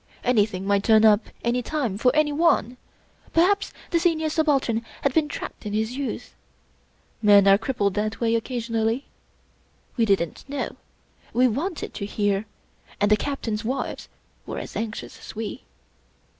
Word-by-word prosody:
Anything 210 -6 +1
might 200 0 +2
turn 220 0 +5
up 215 0 +5 0.2
any 240 +1 +1
day 250 -6 -2
for 250 +4 +4
anyone. 295 -5 +2 0.6
Perhaps 385 +5 +3 0.2
the 340 - +3
Senior 325 -2 +1
Subaltern 275 -8 +1 0.2
had 280 - +2
been 310 0 +3
trapped 295 - -7
in 210 -2 -4
his 220 +3 -1
youth. 280 -1 -4 0.9
Men 205 -2 +6
are 195 +1 +7
crippled 220 -5 0
that 215 +2 -2
way 230 -1 +1
occasionally. 230 +1 -1 0.9
We 230 - +3
didn't 195 -6 0
know; 285 - -3 0.6
we 250 +1 +4
wanted 305 - -3
to 200 - -4
hear; 205 0 0 0.5
and 205 +1 +2
the - - +8
Captains' 225 -3 -3
wives 255 +5 -3 0.4
were - - -5
as - - -7
anxious 225 -1 -5
as - - -10
we. 225 +3 -5
230 Hz, 145 wpm, -24 LUFS, 210-280 Hz, 0.9 s, the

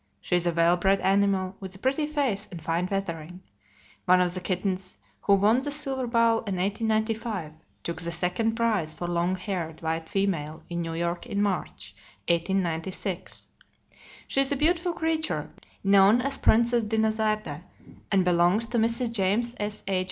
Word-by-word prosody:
She 180 - -1
is 175 0 +1
a - - +3
well 170 +1 +3
bred 195 +2 +2
animal, 195 -1 +2
with 190 -1 -7
a - - -10
pretty 270 +7 0
face 265 -9 0
and 175 - -8
fine 170 +3 -1
feathering. 180 -2 -4 0.6
One 185 0 +5
of 180 -1 +1
the 185 - -4
kittens 185 0 -2 0.2
who 200 - +4
won 215 +6 +3
the 290 - -3
silver 270 -3 -2
bowl 230 -1 +3
in 200 -3 -4
1895 215 -2 -1 0.3
took 170 +1 -3
the 170 0 -3
second 180 +6 0
prize 215 -9 0
for 175 - -4
long 175 +1 0
haired 180 -4 -4
white 160 0 -2
female 165 -6 -1
in 170 0 -2
New 165 -1 -4
York, 170 +5 -2
in 205 -4 -2
March, 180 - -2 0.3
1896. 175 +1 -1 0.8
She 270 - +2
is 275 +1 +1
a - - +2
beautiful 340 +4 +1
creature, 320 -1 -2 0.3
known 195 +3 +6
as 275 +1 -2
Princess 235 +1 +4
Dinazarde, 220 0 0 0.5
and 190 -2 +3
belongs 180 +5 +3
to 240 - +1
Mrs. 230 +2 +1
James 230 +3 0
S.H. 205 -2 -2
195 Hz, 160 wpm, -27 LUFS, 175-225 Hz, 0.8 s, known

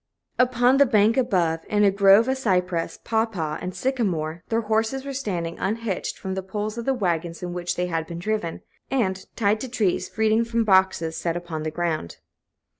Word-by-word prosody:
Upon 250 +1 +4
the 280 0 +6
bank 215 0 +4
above, 175 -10 +1
in 210 0 +2
a 200 - +5
grove 200 +3 +6
of 265 - +1
cypress, 180 -8 0
pawpaw, 220 -9 -1
and 180 0 -5
sycamore, 175 -11 -1
their 225 0 +1
horses 225 +5 0
were 280 - -4
standing, 180 -10 -3
unhitched 215 0 -2
from 190 - -4
the 190 - -2
poles 210 +3 -4
of 235 - -5
the 270 - +2
wagons 170 -5 -2
in 175 -1 -4
which 175 0 -2
they 180 - 0
had 165 -2 -2
been 170 - -6
driven, 180 -2 -3 0.3
and, 190 -8 0
tied 210 0 +2
to 260 - -5
trees, 200 -6 0
feeding 220 +1 +2
from 230 0 0
boxes 190 -5 +2
set 170 0 -1
upon 170 -3 -5
the 155 - -2
ground. 160 - -3
195 Hz, 190 wpm, -24 LUFS, 175-225 Hz, 0.3 s, the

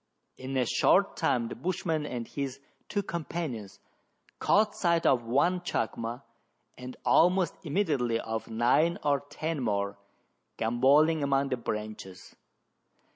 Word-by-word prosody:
In 130 +1 -5
a 125 - +2
short - - +3
time 115 -2 +1
the - - -6
bushman 165 0 -2
and 120 -4 -5
his 135 -2 -4 0.3
two 205 - -1
companions 155 - -5 0.6
caught 210 0 +3
sight 170 -2 +1
of 120 -3 +3
one 170 +9 +2
chacma, 115 -6 -3 0.5
and 125 0 -9
almost 180 +1 +4
immediately 145 - 0
of 110 0 -4
nine 125 +9 +2
or 145 -1 +2
ten 155 +2 -4
more, 100 -3 -1 0.6
gambolling 140 +8 +3
among 140 0 +1
the 130 - -1
branches. 105 -5 -6
135 Hz, 125 wpm, -29 LUFS, 115-165 Hz, 0.6 s, almost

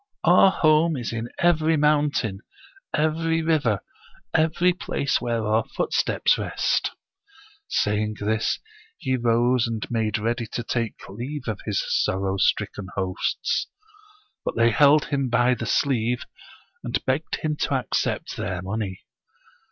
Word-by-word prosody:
Our 180 +3 +7
home 155 -2 +3
is 120 -2 -4
in 115 +1 -4
every 160 -2 +3
mountain, 145 -9 +1 0.5
every 160 +1 +1
river, 145 - +1 0.5
every 165 +3 +3
place 140 -5 -1
where 115 -2 -1
our 110 +1 +2
foot - - -1
steps - - +2
rest'' - - 0 0.8
Saying 105 - 0
this, 110 +2 0 0.4
he 130 -4 -1
rose 120 0 +2
and 115 -2 -3
made 110 -3 0
ready 115 +2 -2
to 120 - -2
take 115 -1 -3
leave 125 +9 -6
of 110 -3 -2
his 105 -3 0
sorrow 95 0 0
stricken 95 +1 0
hosts. 95 -1 -1 0.8
But - - -3
they 115 0 +4
held 145 +4 +5
him 140 -3 -1
by 120 +1 +3
the 115 -1 -4
sleeve, 125 -3 +1 0.6
and - - 0
begged 135 +5 0
him 155 -1 -2
to 140 - 0
accept 130 - -2
their 90 -2 -3
money. 95 -1 -4
120 Hz, 135 wpm, -24 LUFS, 110-150 Hz, 0.8 s, Our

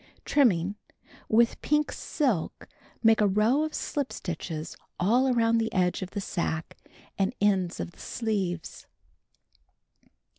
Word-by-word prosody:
^ - - -28 0.2
Trimming. 205 - +2 0.3
— - - -25
With 235 -1 +3
pink 300 0 +1
silk, 245 - -2 0.4
make 225 -1 +5
a 210 - +5
row 215 +8 +3
of 310 0 -3
slip 285 -3 -2
stitches 165 -2 -5 0.2
all 240 +9 +3
around 230 -1 +3
the 225 0 -1
edge 180 0 +1
of 185 - -4
the 200 - -4
sacque, 165 -4 -3 0.4
and 195 +6 +1
ends 190 -4 +1
of - - -4
the - - -22
sleeves. 195 -7 -3
210 Hz, 140 wpm, -27 LUFS, 180-235 Hz, 0.4 s, make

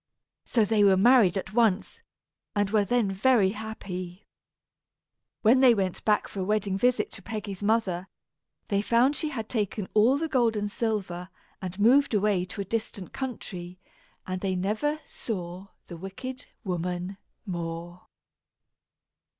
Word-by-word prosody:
So 225 -3 +2
they 210 0 +3
were 195 -2 +6
married 220 -3 +5
at 190 +2 -5
once, 220 -4 +1 0.5
and 205 -1 +1
were 215 -2 +4
then 230 -2 +1
very 200 0 +3
happy. 195 -4 -7 1.2
When 235 +4 +6
they 255 -3 +7
went 190 -3 -2
back 210 -1 +2
for 200 - -7
a - - 0
wedding 205 -1 0
visit 245 +5 +1
to 195 - -9
Peggy's 205 -1 -6
mother, 205 -4 +1 0.6
they 200 -2 +2
found 240 +6 +3
she 310 - -2
had 225 -7 -4
taken 210 -3 -2
all 230 +6 +5
the 325 +2 -1
gold 240 -6 +2
and 205 -1 -2
silver 195 -6 -2 0.3
and 185 +1 -6
moved 250 +3 +5
away 200 -3 +2
to 195 +2 -5
a - - -4
distant 210 -3 -4
country; 185 -9 -6 0.5
and 185 0 -4
they 190 -2 0
never 215 +12 -1
saw 185 -3 -6 0.2
the 170 - -9
wicked 195 +9 -7 0.2
woman 180 0 -3 0.3
more. 170 -1 -5
205 Hz, 145 wpm, -27 LUFS, 185-230 Hz, 1.2 s, they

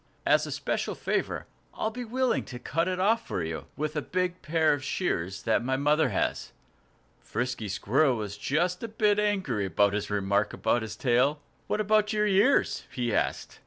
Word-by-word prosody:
As - - +3
a - - -5
special - - -2
favor, - - -2 0.3
I'll 220 - -1
be 245 +2 -5
willing 255 +2 0
to 125 - -8
cut 165 +7 -1
it 185 0 -1
off 225 +4 +2
for 85 - -2
you, 80 0 -5
with 155 +1 -2
a 150 - 0
big 180 +2 -2
pair 160 -1 +2
of 145 -2 -3
shears 95 - -2
that 115 +1 +2
my 130 +2 0
mother 150 +3 +3
has." - - -2 0.7
Frisky 125 -3 -3
Squirrel 130 +8 +2
was 105 -2 -4
just 175 - 0
a 230 - -3
bit 210 -1 +2
angry 190 - 0
at 85 - -13
this 105 0 -2
remark 100 0 +1
about 115 +1 +1
his 110 -1 -5
tail. 130 +5 +2 0.3
"What - - -1
about 215 0 +2
your 210 0 +2
ears?" 210 +7 +3
he 120 -3 -2
asked. - - -1
150 Hz, 185 wpm, -28 LUFS, -, 0.7 s, As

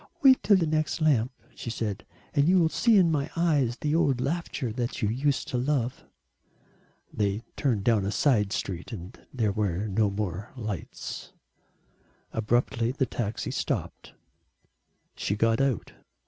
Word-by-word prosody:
"Wait 265 -2 +7
till 205 - +5
the 175 - +1
next 155 0 0
lamp," 135 -6 +3 0.2
she - - -6
said. 105 -3 -3 0.3
"And 145 0 +3
you 185 - +5
will 165 -3 +4
see 230 +5 +4
in 175 -4 +5
my 145 -3 0
eyes 145 -8 +2
the 150 0 -1
old 145 -6 +2
laughter 140 -4 -2
that 120 +1 -3
you 105 - +2
used 135 +4 0
to 125 - -1
love." 130 -2 -1 1.1
They 105 +1 0
turned 115 -8 0
down 110 -3 +3
a 100 - -1
side 105 -7 +2
street 90 0 -4
and 95 -4 -7 0.2
there 110 -5 0
were 100 -1 -1
no 105 +1 +2
more 100 0 -4
lights. 105 -6 -6 1.0
Abruptly 120 +1 +1
the 135 0 0
taxi 115 -4 -3
stopped. - - -3 1.0
She 100 - -1
got 115 +3 +2
out. 135 -7 0
120 Hz, 150 wpm, -27 LUFS, 105-145 Hz, 1.1 s, Wait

